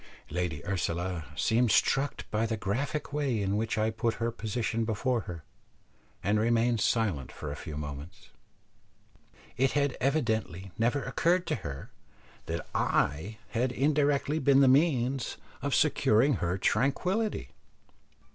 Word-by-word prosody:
Lady 85 -3 -2
Ursula 90 -3 -2
seemed 120 +1 +2
struck 135 +6 +2
by 110 +1 +1
the 110 0 -2
graphic 130 +9 -2
way 140 -6 0
in 100 0 0
which 110 +1 -1
I 110 +1 +1
put 110 0 -1
her 115 0 -1
position 115 0 -2
before 115 +2 0
her, 85 -3 -7 0.8
and 105 +3 +2
remained 115 0 +2
silent 100 - 0
for 75 - -6
a - - -4
few 75 -1 -7
moments. 75 +2 -8 1.3
It 135 +1 +2
had 145 -2 +1
evidently 110 - 0
never 120 +5 +1
occurred 175 +7 +1
to - - 0
her, 70 -7 -7 0.6
that 85 +1 -3
I 80 +10 0
had 120 +2 0
indirectly 145 +2 +1
been 140 0 +5
the 135 - +6
means 135 -3 +2 0.2
of - - 0
securing 120 +4 +3
her 90 +1 -1
tranquillity. 185 - 0
115 Hz, 135 wpm, -29 LUFS, 95-135 Hz, 1.3 s, the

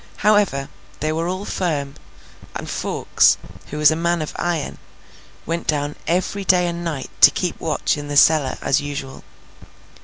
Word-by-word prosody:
However, 205 -10 +3 0.3
they 155 +1 -1
were 165 +2 -1
all 185 +3 -3
firm; 145 -9 -2 0.6
and - - -5
Fawkes, - - +2 0.3
who 150 - -6
was 150 0 +5
a - - 0
man 170 0 0
of 155 - -7
iron, 170 -4 -2 0.7
went 170 +1 -3
down 145 -1 -1
every 185 +3 -1
day 180 -2 +3
and 170 0 -3
night 155 -6 -4
to - - +11
keep - - -3
watch - - 0
in 145 - -7
the 145 0 -1
cellar 150 -4 +4
as 135 - +2
usual. 145 -2 -6
160 Hz, 160 wpm, -21 LUFS, 145-175 Hz, 0.7 s, to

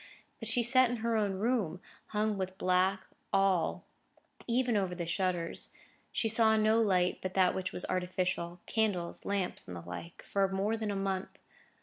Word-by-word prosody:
But 225 - -3
she 240 +1 +3
sat 255 +1 +4
in 245 - -1
her 230 -1 +2
own 205 -3 +1
room, 195 -4 0 0.3
hung 215 0 0
with 190 -1 -4
black, 185 0 +2 0.3
all, 195 -4 +2 0.6
even 245 0 +2
over 190 -3 0
the 170 -1 -3
shutters. 175 -1 -1 0.4
She 225 - +1
saw 225 0 +4
no 220 +1 +4
light 185 -4 +2
but 185 0 -4
that 185 -2 +4
which 185 -1 -3
was - - -1
artificial—candles, 180 +1 -1
lamps, 200 -2 -2
and 90 - -6
the - - -7
like—for 170 - -2
more 195 +3 0
than 220 -1 -3
a 200 - -1
month. 195 -1 -2
195 Hz, 160 wpm, -32 LUFS, 180-220 Hz, 0.6 s, sat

